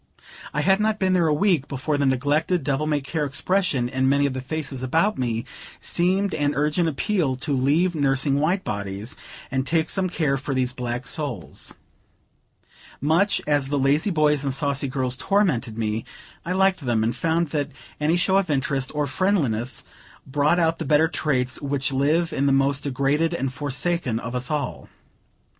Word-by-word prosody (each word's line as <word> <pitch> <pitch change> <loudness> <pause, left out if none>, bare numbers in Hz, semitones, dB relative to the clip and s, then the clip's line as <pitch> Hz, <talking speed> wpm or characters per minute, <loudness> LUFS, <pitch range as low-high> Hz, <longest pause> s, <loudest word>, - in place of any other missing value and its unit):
I 150 - -1
had 195 +5 +3
not 215 0 +1
been 190 -2 +1
there 175 -3 +3
a - - +2
week, 160 -2 +2
before 145 +2 -2
the 140 -1 +1
neglected, 145 +6 +1
devil 145 +2 0
may 150 -2 +1
care 150 +3 -2
expression 145 -2 0
in 130 +1 +1
many 140 +1 +3
of 140 - 0
the 130 - -4
faces 135 -1 -4
about 165 +11 +1
me, 115 -2 -1 0.3
seemed 190 +3 0
an 145 -1 0
urgent 150 +4 +1
appeal 160 -2 0
to 140 +3 -3
leave 150 +8 +2
nursing 140 -1 +1
white 175 +6 +1
bodies, 100 +2 -4 0.4
and 130 0 0
take 160 -1 +1
some 190 -2 +1
care 150 -5 0
for 135 0 -4
these 130 -1 0
black 125 0 -4
souls. 135 - -5 1.2
Much 165 +8 +2
as 145 -2 +1
the 145 +1 -1
lazy 140 +7 +2
boys 150 -4 +2
and 135 -2 -1
saucy 140 -1 0
girls 130 -1 -1
tormented 145 - 0
me, 110 0 -1 0.4
I 180 - -2
liked 190 0 +3
them, 120 -4 +1
and 115 +2 0
found 165 0 0
that 145 -2 -1 0.3
any 155 +3 +2
show 190 +2 +3
of 195 -3 +1
interest 135 -2 0
or 150 0 +1
friendliness 130 - 0 0.4
brought 145 +5 +2
out 165 -1 +1
the - - -2
better 150 +3 +4
traits 130 -6 -1
which 140 -1 -1
live 155 +5 +1
in 140 +1 +1
the - - +3
most 135 +1 +2
degraded 145 +5 +1
and 135 -4 -2
forsaken 145 -2 -1
of 120 +1 -5
us 125 0 -2
all. 150 -3 -3
145 Hz, 180 wpm, -23 LUFS, 130-165 Hz, 1.2 s, better